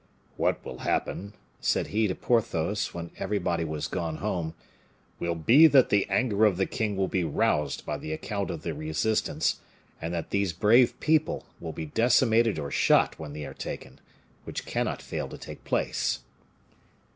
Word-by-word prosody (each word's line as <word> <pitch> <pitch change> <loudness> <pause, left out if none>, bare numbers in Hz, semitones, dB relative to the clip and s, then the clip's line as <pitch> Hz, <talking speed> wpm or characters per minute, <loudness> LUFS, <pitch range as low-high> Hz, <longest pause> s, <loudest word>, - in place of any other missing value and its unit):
"What - - 0
will - - -7
happen," 100 +2 -2 0.3
said - - 0
he 110 +1 +2
to 90 - -2
Porthos, 105 -4 0
when 85 -1 -7
everybody 90 -4 -1
was 75 -1 -3
gone 80 -1 -3
home, 85 -6 -2 0.6
"will 85 -1 -1
be 125 - +7
that 135 -4 +5
the 100 -1 +2
anger 110 -4 +2
of 100 -4 +3
the 95 - +2
king 105 -3 -2
will 95 -1 +1
be 95 -1 0
roused 75 -2 0
by - - -3
the 80 - -6
account 100 +5 -3
of 85 - -5
the 85 - -2
resistance; 80 +9 0 0.4
and 80 +1 -3
that 85 -2 -4
these 100 -3 +1
brave 115 +8 +4
people 155 0 +1
will 80 - -5
be 80 - -5
decimated 115 +3 +3
or 70 -2 -4
shot - - +3
when 75 -2 -7
they 75 -1 -5
are - - -7
taken, 65 +1 -7 0.4
which - - -6
cannot - - -2
fail - - -4
to - - -8
take - - -10
place." - - 0
95 Hz, 170 wpm, -27 LUFS, 80-110 Hz, 0.6 s, be